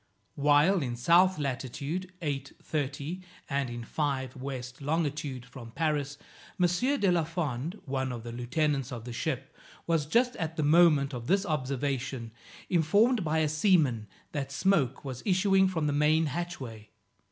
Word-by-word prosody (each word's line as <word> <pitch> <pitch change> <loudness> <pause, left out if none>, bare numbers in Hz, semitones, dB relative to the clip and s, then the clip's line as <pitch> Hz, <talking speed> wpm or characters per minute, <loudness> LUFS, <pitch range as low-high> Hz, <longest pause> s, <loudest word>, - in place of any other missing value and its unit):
While 150 +6 +4
in 125 -4 -2
south 175 +9 +4
latitude 140 +6 -3
8 140 -2 -3
30, 145 +4 -3 0.3
and 140 -2 -1
in 120 0 -6
5 130 -1 -2
west 130 -1 -6
longitude 145 -4 -2
from 125 -2 -10
Paris, 145 +1 -1 0.4
M. 180 - +5 0.3
de 195 -3 +3
la 170 -2 +2
Fond, 160 - -3
one 130 -2 -2
of 120 -2 -6
the 120 - -6
lieutenants 135 +3 -1
of 120 -2 -6
the 120 - -6
ship, 135 +1 -3 0.3
was, 165 -3 +1
just 245 +8 +2
at 160 -1 -3
the 155 - +1
moment 150 -3 +5
of 120 -2 -6
this 195 +4 +2
observation, 135 - -2 0.4
informed 200 +7 +3
by 160 0 0
a 160 -1 +3
seaman, 150 - +2 0.2
that 140 -2 -3
smoke 140 -5 +1
was 130 -2 -5
issuing 190 0 +4
from 165 -5 -1
the 145 - +1
main 155 +2 +3
hatchway. 135 -9 -5
145 Hz, 150 wpm, -29 LUFS, 130-165 Hz, 0.4 s, M